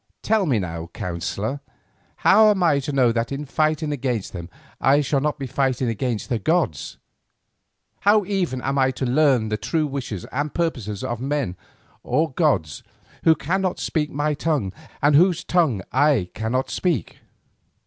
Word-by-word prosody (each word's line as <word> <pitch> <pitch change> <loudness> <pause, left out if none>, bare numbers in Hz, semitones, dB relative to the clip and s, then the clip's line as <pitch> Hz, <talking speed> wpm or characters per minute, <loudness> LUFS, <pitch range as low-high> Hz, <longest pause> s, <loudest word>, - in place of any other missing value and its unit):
"Tell 215 -4 +2
me 130 -6 +2
now, 85 -4 -4
counsellor, 100 +9 -3 0.7
how 215 +2 +7
am 195 -3 +2
I 155 -5 +4
to 140 +2 -4
know 130 -4 +3
that 115 +2 -2
in 140 +2 -4
fighting 155 +1 0
against 125 -7 -2
them 85 -2 -7 0.3
I 140 +2 +4
shall 140 0 +1
not 150 +1 -1
be 140 - -5
fighting 130 -1 0
against 115 0 -2
the 120 -4 -1
gods; 160 - -1 1.0
how 205 0 +4
even 180 -10 -2
am 135 +1 0
I 130 0 +4
to 130 0 -3
learn 130 -4 +3
the 105 - -1
true 155 +6 -1
wishes 135 -9 -5
and 145 +3 -2
purposes 115 - -2
of 120 0 -3
men 135 -8 -1 0.5
or 155 +5 0
gods 130 - 0 0.4
who 160 - +6
cannot 185 +4 -1
speak 150 -3 -1
my 150 +2 -1
tongue 145 - -1 0.3
and 145 0 +5
whose 175 +2 +4
tongue 155 - +1
I 135 -12 +2
cannot 115 +4 -2
speak?" 170 - -1
140 Hz, 160 wpm, -23 LUFS, 115-155 Hz, 1.0 s, how